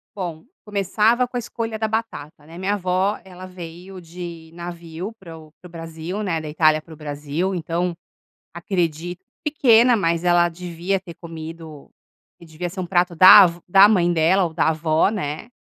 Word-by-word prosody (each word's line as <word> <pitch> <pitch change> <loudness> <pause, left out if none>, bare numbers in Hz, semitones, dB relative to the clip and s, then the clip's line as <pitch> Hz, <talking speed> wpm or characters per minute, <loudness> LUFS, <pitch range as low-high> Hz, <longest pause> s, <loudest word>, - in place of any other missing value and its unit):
Bom, 175 -4 -6 0.2
começava 210 +4 +1
com 250 - -5
a - - 0
escolha 225 -1 -5
da 220 - -1
batata, 210 -10 -5
né? 165 +2 -12
Minha 195 +2 -1
avó, 185 +1 0
ela 185 -1 -11
veio 180 +1 -10
de 170 -1 -9
navio 170 +3 -7
para 165 -4 -11
o 155 -1 -15
para 180 - -12
o - - -19
Brasil, 165 +4 -6
né, 165 -5 -1
da 155 - -7
Itália 155 0 +3
para 160 - -14
o - - -13
Brasil, 150 +5 -3
então 175 +1 -2 0.6
acredito 175 0 -3 0.2
pequena, 250 -5 +4
mas 170 -4 0
ela 175 -1 +3
devia 175 +2 -3
ter 175 -3 -11
comido 160 -2 -10 0.5
e 170 - -14
devia 165 +2 -6
ser 185 +3 -9
um - - -4
prato 175 -1 +1
da 190 +3 +10
v 170 0 -8
da 195 +3 +7
mãe 180 -5 +2
dela 170 +4 +3
ou 165 -2 -3
da 160 - +1
avó, 155 +2 +1
né? 160 -4 -4
175 Hz, 180 wpm, -21 LUFS, 165-195 Hz, 0.6 s, da